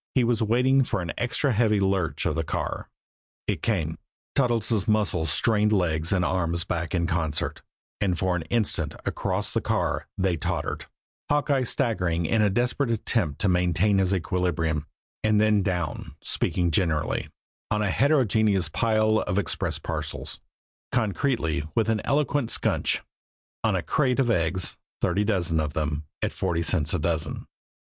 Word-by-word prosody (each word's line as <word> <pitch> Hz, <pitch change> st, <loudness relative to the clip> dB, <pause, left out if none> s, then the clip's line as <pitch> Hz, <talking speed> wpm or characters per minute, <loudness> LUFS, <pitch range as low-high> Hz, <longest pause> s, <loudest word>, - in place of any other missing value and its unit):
He 130 Hz, -, +4 dB
was 115 Hz, -1 st, +1 dB
waiting 125 Hz, +5 st, +3 dB
for 100 Hz, -, -2 dB
an 85 Hz, -, -4 dB
extra 125 Hz, +3 st, +1 dB
heavy 110 Hz, -2 st, +3 dB
lurch 95 Hz, -4 st, 0 dB
of -, -, +1 dB
the 80 Hz, +1 st, -1 dB
car. -, -, -3 dB, 0.6 s
It -, -, -1 dB
came. 80 Hz, -9 st, -1 dB, 0.3 s
Toddles' 115 Hz, -5 st, +1 dB
muscles 95 Hz, -8 st, +2 dB
strained 105 Hz, +5 st, +3 dB
legs 80 Hz, -5 st, +1 dB
and 90 Hz, -3 st, +2 dB
arms 85 Hz, -2 st, 0 dB
and -, -, -21 dB
back 85 Hz, 0 st, -2 dB
in 85 Hz, -1 st, +1 dB
concert, 80 Hz, -4 st, -1 dB, 0.4 s
and 95 Hz, -4 st, +1 dB
for 95 Hz, 0 st, +1 dB
an 85 Hz, -, -1 dB
instant 100 Hz, -10 st, 0 dB
across -, -, -2 dB
the -, -, +1 dB
car -, -, -1 dB
they 95 Hz, -3 st, +1 dB
tottered, -, -, -3 dB, 0.4 s
Hawkeye 145 Hz, -2 st, +2 dB
staggering 95 Hz, -10 st, 0 dB
in 110 Hz, +7 st, +2 dB
a 105 Hz, -, +4 dB
desperate 120 Hz, +5 st, 0 dB
attempt 110 Hz, -, 0 dB
to 105 Hz, -, +3 dB
maintain 90 Hz, +2 st, +2 dB
his 95 Hz, -1 st, +2 dB
equilibrium 85 Hz, -4 st, 0 dB, 0.4 s
and 110 Hz, -1 st, +3 dB
then 105 Hz, -1 st, +4 dB
down 90 Hz, -4 st, -3 dB
speaking 85 Hz, -2 st, 0 dB
generally, 80 Hz, -3 st, 0 dB, 0.4 s
on 105 Hz, 0 st, +1 dB
a 100 Hz, -, +1 dB
heterogeneous 110 Hz, -, +2 dB
pile 110 Hz, +3 st, +2 dB
of 90 Hz, -, -2 dB
express 100 Hz, -5 st, 0 dB
parcels; -, -, -4 dB, 0.5 s
concretely, 110 Hz, -, 0 dB
with 115 Hz, -1 st, +2 dB
an 110 Hz, -1 st, +1 dB
eloquent 145 Hz, -3 st, +1 dB
squnch, -, -, +1 dB, 0.6 s
on -, -, +2 dB
a -, -, -1 dB
crate 125 Hz, 0 st, +1 dB
of 125 Hz, -3 st, +3 dB
eggs, 90 Hz, -1 st, 0 dB, 0.2 s
thirty 105 Hz, -, +1 dB
dozen 90 Hz, -6 st, 0 dB
of 75 Hz, -1 st, -1 dB
them, 75 Hz, -1 st, -2 dB, 0.2 s
at -, -, 0 dB
forty 85 Hz, -3 st, -1 dB
cents 80 Hz, -2 st, +1 dB
a -, -, 0 dB
dozen. 80 Hz, -1 st, -2 dB
95 Hz, 155 wpm, -26 LUFS, 85-115 Hz, 0.6 s, He